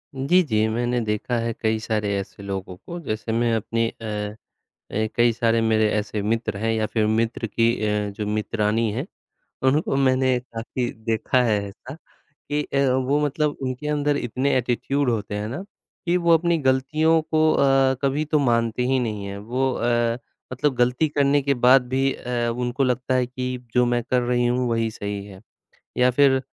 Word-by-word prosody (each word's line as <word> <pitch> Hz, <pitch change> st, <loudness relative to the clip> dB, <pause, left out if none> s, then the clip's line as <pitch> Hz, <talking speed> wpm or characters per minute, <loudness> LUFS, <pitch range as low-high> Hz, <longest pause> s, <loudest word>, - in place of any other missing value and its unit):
जी, 165 Hz, +8 st, +3 dB
जी 110 Hz, -6 st, +1 dB
मैंने 120 Hz, +2 st, 0 dB
देखा 105 Hz, +3 st, -1 dB
है 115 Hz, 0 st, -2 dB
कई 110 Hz, -1 st, +1 dB
सारे 105 Hz, -2 st, -1 dB
ऐसे 100 Hz, +1 st, -7 dB
लोगों 95 Hz, -2 st, -5 dB
को। 175 Hz, -, -8 dB
जैसे 110 Hz, +1 st, -3 dB
मैं 115 Hz, 0 st, +1 dB
अपनी 115 Hz, +1 st, 0 dB
अ 105 Hz, -1 st, -5 dB, 0.6 s
अ, 110 Hz, +1 st, 0 dB
कई 120 Hz, 0 st, +4 dB
सारे 115 Hz, 0 st, +1 dB
मेरे 110 Hz, -1 st, +2 dB
ऐसे 105 Hz, 0 st, -2 dB
मित्र 110 Hz, -1 st, -1 dB
हैं 115 Hz, +1 st, 0 dB
या 110 Hz, -1 st, 0 dB
फिर 110 Hz, -1 st, 0 dB
मित्र 115 Hz, +1 st, 0 dB
की 115 Hz, +2 st, +2 dB, 0.2 s
अ, 105 Hz, -1 st, 0 dB
जो 105 Hz, +1 st, -5 dB
मित्रानी 105 Hz, +1 st, 0 dB
हैं, 130 Hz, -, -3 dB, 0.6 s
उनको 145 Hz, 0 st, +1 dB
मैंने 130 Hz, -1 st, +2 dB
काफ़ी 120 Hz, +1 st, -4 dB
देखा 115 Hz, +3 st, +1 dB
है 105 Hz, -3 st, +2 dB
ऐसा 125 Hz, +7 st, -11 dB
कि 150 Hz, -2 st, -7 dB
अ, 140 Hz, -, -3 dB, 0.2 s
वो 130 Hz, +3 st, +1 dB
मतलब 150 Hz, +1 st, 0 dB
उनके 130 Hz, +3 st, -3 dB
अंदर 145 Hz, -1 st, +1 dB
इतने 130 Hz, +2 st, 0 dB
एटीट्यूड 130 Hz, +2 st, 0 dB
होते 105 Hz, -2 st, -2 dB
हैं 105 Hz, +1 st, -3 dB
ना 140 Hz, +11 st, -5 dB, 0.4 s
कि 175 Hz, +1 st, +2 dB
वो 170 Hz, -1 st, +4 dB
अपनी 170 Hz, 0 st, +2 dB
गलतियों 155 Hz, +4 st, +2 dB
को 155 Hz, 0 st, +2 dB
अ, 135 Hz, -1 st, +3 dB
कभी 140 Hz, +3 st, +1 dB
तो 150 Hz, 0 st, +1 dB
मानते 115 Hz, -2 st, +1 dB
ही 130 Hz, -, +3 dB
नहीं 105 Hz, -4 st, -3 dB
हैं। 100 Hz, 0 st, -6 dB
वो 125 Hz, +5 st, -1 dB
अ, 120 Hz, 0 st, 0 dB, 0.3 s
मतलब 130 Hz, +2 st, 0 dB
गलती 125 Hz, +5 st, +2 dB
करने 145 Hz, 0 st, +2 dB
के 140 Hz, 0 st, +1 dB
बाद 130 Hz, -1 st, +6 dB
भी 135 Hz, +1 st, +1 dB
अ, 120 Hz, -1 st, -2 dB
उनको 125 Hz, +2 st, -1 dB
लगता 125 Hz, +1 st, 0 dB
है 125 Hz, -1 st, +2 dB
कि 125 Hz, 0 st, -4 dB, 0.2 s
जो 125 Hz, 0 st, +4 dB
मैं 120 Hz, 0 st, +1 dB
कर 125 Hz, -1 st, +3 dB
रही 120 Hz, 0 st, +1 dB
हूँ 125 Hz, 0 st, +1 dB
वही 115 Hz, -1 st, 0 dB
सही 100 Hz, -1 st, -5 dB
है। 95 Hz, -1 st, -12 dB, 0.6 s
या 125 Hz, 0 st, +4 dB
फिर 135 Hz, 0 st, +4 dB
120 Hz, 185 wpm, -23 LUFS, 110-135 Hz, 0.6 s, बाद